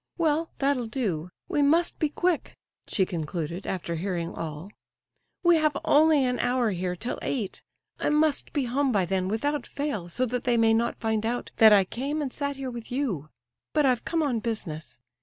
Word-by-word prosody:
"Well, 325 Hz, -1 st, +1 dB
that'll 275 Hz, -4 st, +1 dB
do; 190 Hz, -, -2 dB, 0.2 s
we 310 Hz, -5 st, +1 dB
must 325 Hz, +4 st, +3 dB
be 310 Hz, -, +2 dB
quick," 345 Hz, +2 st, -1 dB, 0.3 s
she 190 Hz, -, +1 dB
concluded, 170 Hz, 0 st, -4 dB
after 180 Hz, -2 st, -3 dB
hearing 175 Hz, -1 st, -2 dB
all. 160 Hz, +4 st, -6 dB, 0.7 s
"We 345 Hz, -1 st, +6 dB
have 305 Hz, -2 st, +2 dB
only 300 Hz, -2 st, +5 dB
an 250 Hz, -1 st, 0 dB
hour 245 Hz, -3 st, +1 dB
here, 180 Hz, -1 st, -2 dB
till 235 Hz, +8 st, -4 dB
eight; 225 Hz, -8 st, -3 dB, 0.4 s
I -, -, +1 dB
must 300 Hz, -1 st, +2 dB
be 285 Hz, -4 st, 0 dB
home 265 Hz, +3 st, +1 dB
by 200 Hz, -5 st, +2 dB
then 185 Hz, +1 st, 0 dB
without 285 Hz, +9 st, -1 dB
fail, 280 Hz, -, -3 dB
so 250 Hz, +9 st, 0 dB
that 250 Hz, 0 st, -2 dB
they 240 Hz, -1 st, +2 dB
may 225 Hz, -1 st, +4 dB
not 235 Hz, +1 st, 0 dB
find 220 Hz, -1 st, 0 dB
out 240 Hz, +2 st, -2 dB
that 220 Hz, -2 st, +8 dB
I 200 Hz, -2 st, +7 dB
came 275 Hz, +9 st, -3 dB
and 280 Hz, -4 st, -3 dB
sat 285 Hz, -1 st, -2 dB
here 265 Hz, -1 st, -5 dB
with 235 Hz, -1 st, -8 dB
you; 220 Hz, -, -2 dB, 0.4 s
but 300 Hz, -2 st, +3 dB
I've 250 Hz, -3 st, +2 dB
come 330 Hz, -1 st, 0 dB
on 255 Hz, -6 st, 0 dB
business. 160 Hz, -, -5 dB
240 Hz, 190 wpm, -27 LUFS, 190-285 Hz, 0.7 s, that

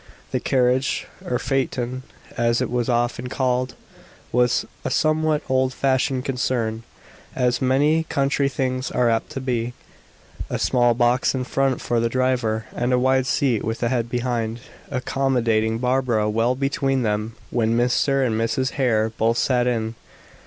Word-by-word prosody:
The -, -, 0 dB
carriage 130 Hz, +1 st, +1 dB, 0.2 s
or 125 Hz, -, -1 dB
phaeton 130 Hz, -2 st, -2 dB, 0.3 s
as 115 Hz, 0 st, +2 dB
it -, -, -2 dB
was 125 Hz, 0 st, 0 dB
often 120 Hz, +1 st, 0 dB
called 130 Hz, -1 st, -1 dB, 0.6 s
was 125 Hz, 0 st, +2 dB, 0.2 s
a -, -, -1 dB
somewhat 155 Hz, -1 st, +1 dB
old 130 Hz, 0 st, +1 dB
fashioned 130 Hz, -1 st, +1 dB
concern, 120 Hz, -4 st, -1 dB, 0.5 s
as 125 Hz, -1 st, +1 dB
many 145 Hz, +5 st, +2 dB
country 140 Hz, -1 st, +1 dB
things 130 Hz, -2 st, -2 dB
are 120 Hz, -2 st, +2 dB
apt 115 Hz, -, -1 dB
to 135 Hz, -, -3 dB
be. 120 Hz, -2 st, -2 dB, 0.7 s
A -, -, -1 dB
small 120 Hz, -2 st, +2 dB
box 120 Hz, +2 st, +2 dB
in 130 Hz, -, -1 dB
front 135 Hz, 0 st, 0 dB
for 120 Hz, -1 st, 0 dB
the 115 Hz, 0 st, +1 dB
driver, 125 Hz, -3 st, 0 dB
and 120 Hz, +1 st, 0 dB
a 125 Hz, -, +4 dB
wide 130 Hz, +1 st, +2 dB
seat 125 Hz, -4 st, +1 dB
with 115 Hz, +2 st, -3 dB
a 120 Hz, -, +2 dB
head 120 Hz, -2 st, -1 dB
behind, 120 Hz, -2 st, -2 dB, 0.3 s
accommodating 120 Hz, -4 st, 0 dB
Barbara 125 Hz, -3 st, +1 dB
well 115 Hz, +3 st, +1 dB
between 135 Hz, -1 st, 0 dB
them 105 Hz, +1 st, -1 dB, 0.2 s
when 115 Hz, -1 st, +1 dB
Mr. 130 Hz, +3 st, +2 dB
and 115 Hz, -, 0 dB
Mrs. 115 Hz, +4 st, 0 dB
Hare 110 Hz, -5 st, +1 dB
both 115 Hz, +1 st, +2 dB
sat 125 Hz, -1 st, +2 dB
in. 115 Hz, -2 st, -1 dB
125 Hz, 150 wpm, -22 LUFS, 115-130 Hz, 0.7 s, a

